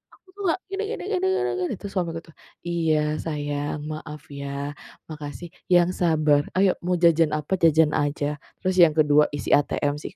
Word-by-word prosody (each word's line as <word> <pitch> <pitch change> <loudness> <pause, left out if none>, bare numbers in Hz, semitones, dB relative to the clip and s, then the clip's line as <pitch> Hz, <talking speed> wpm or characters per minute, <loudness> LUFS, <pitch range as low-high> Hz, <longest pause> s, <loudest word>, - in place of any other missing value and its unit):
aku - - -34
tuh 405 - -9
nggak 335 - +1
gini 400 +2 -2
gini - - -8
gini 375 -1 0
gini 390 0 0 0.2
gini." - - -3
terus 200 - -7
suamiku 165 -3 -1
tuh, 165 - -18 0.3
"Iya 165 -2 +1 0.2
sayang 145 -1 -3
maaf 150 -1 -7 0.2
ya, 140 - -5 0.6
makasih, 150 +3 -7 0.3
yang 175 0 +5
sabar 155 -4 +3
ayo 190 0 +4
mau 180 0 +1
jajan 165 -2 +5
apa, 150 +4 -3
jajan 160 -1 +5
aja." 145 0 -1 0.2
Terus 185 0 0
yang 155 -2 +4
ke-2 150 -1 +4
isi 145 - -5
ATM 145 0 +2
sih. - - -9
155 Hz, 175 wpm, -24 LUFS, 150-175 Hz, 0.6 s, yang